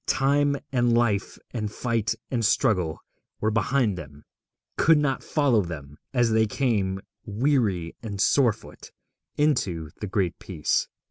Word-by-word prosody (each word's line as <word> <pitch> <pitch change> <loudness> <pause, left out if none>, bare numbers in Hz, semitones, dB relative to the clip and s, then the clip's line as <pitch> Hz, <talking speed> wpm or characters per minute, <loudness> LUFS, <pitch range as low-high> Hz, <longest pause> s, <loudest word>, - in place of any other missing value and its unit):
Time 140 +1 +2
and 120 -2 +3
Life 110 -5 0
and 105 -4 -3
Fight 115 0 -1 0.2
and 120 -3 0
Struggle 90 -6 +2 0.4
were 110 - +1
behind 115 -2 +1
them, 70 -1 -11 0.5
could 165 -1 +5
not 145 -3 0
follow 140 -8 +2
them, 75 -5 -7 0.2
as 120 -3 +2
they 110 0 +3
came, 100 -6 0 0.2
weary 105 - 0
and 105 -4 -6
footsore, 120 +1 +2 0.6
into 90 - 0
the 105 - -4
Great 95 -3 -1
Peace. 80 -6 -1
110 Hz, 130 wpm, -25 LUFS, 95-130 Hz, 0.6 s, could